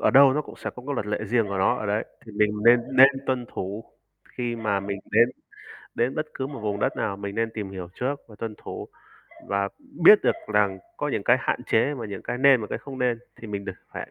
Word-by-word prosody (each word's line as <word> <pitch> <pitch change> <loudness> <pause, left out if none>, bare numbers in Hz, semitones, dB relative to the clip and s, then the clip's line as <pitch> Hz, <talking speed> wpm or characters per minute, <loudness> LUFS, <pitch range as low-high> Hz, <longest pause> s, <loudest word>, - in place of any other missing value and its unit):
ở - - +4
đâu 135 0 +7
nó 150 +2 0
cũng - - -12
sẽ - - -5
có 125 - -11
cái 145 - -2
luật 105 -5 -2
lệ 105 0 -1
riêng 115 +1 +1
của 100 - -2
nó 95 - +3
ở 105 - -4
đấy. 105 +2 0 0.2
Thì 110 - -10
mình 105 0 +2
nên 120 +1 +7 0.2
nên 135 +1 +10 0.2
tuân 125 -2 -1
thủ 100 +4 -5 0.5
khi 120 -1 -2
mà 110 -3 0
mình 100 0 -4
đến 115 +3 +5 0.7
đến 120 +3 0
bất 155 - -1
cứ 130 - -3
một 140 -4 -7
vùng 105 -1 -2
đất - - 0
nào 100 -3 -1
mình 100 0 -6
nên 115 0 0
tìm 105 -3 -4
hiểu 95 -2 -6
trước 140 +3 -2
và 110 - -14
tuân 110 -2 -4
thủ - - -7 0.6
và 100 0 0 0.4
biết 210 +4 +10
được - - +4 0.2
rằng 100 -2 +3 0.2
có - - -2
những - - -1
cái - - +5
hạn - - -1
chế 135 +6 +2
và 120 -5 -5
những 100 -2 -7
cái 125 - -4
nên 135 -1 +6
và 105 - -4
cái - - -4
không 135 -2 -9
nên 125 -2 +1 0.2
thì 115 - -10
mình 100 -1 -4
được - - -4 0.2
phải - - -6
110 Hz, 255 wpm, -25 LUFS, 100-125 Hz, 0.7 s, nên